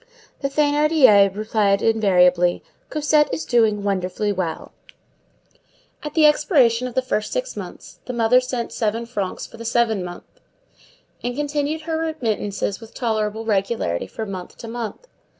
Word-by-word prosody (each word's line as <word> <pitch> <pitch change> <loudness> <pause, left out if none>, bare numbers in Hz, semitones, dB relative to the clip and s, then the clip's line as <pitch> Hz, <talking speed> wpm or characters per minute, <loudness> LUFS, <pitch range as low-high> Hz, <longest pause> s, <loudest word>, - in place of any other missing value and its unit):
The 275 - -2
Thénardiers 290 -9 +4
replied 210 -2 +1
invariably, 180 -5 +3 0.3
"Cosette 300 0 +2
is 160 -1 -3
doing 215 -1 +2
wonderfully 200 +1 -1
well." 180 -5 -4 1.3
At 300 -1 -7
the 315 -2 +5
expiration 260 - +3
of 245 - -9
the 260 - +1
first 215 -4 -2
six - - -3
months - - -9
the 250 - -3
mother 240 +2 +4
sent 250 -2 -4
seven 225 +1 -1
francs 205 -6 -4
for - - -13
the 230 - -8
seventh 230 -4 +1
month, 175 0 -10 0.8
and 245 0 -2
continued 295 +2 -2
her 320 0 -3
remittances 225 -11 -2
with 225 - -13
tolerable 220 -2 -2
regularity 195 - -1
from 205 - -6
month 185 -2 -8
to 230 - -9
month. 235 - -6
225 Hz, 145 wpm, -22 LUFS, 200-275 Hz, 1.3 s, the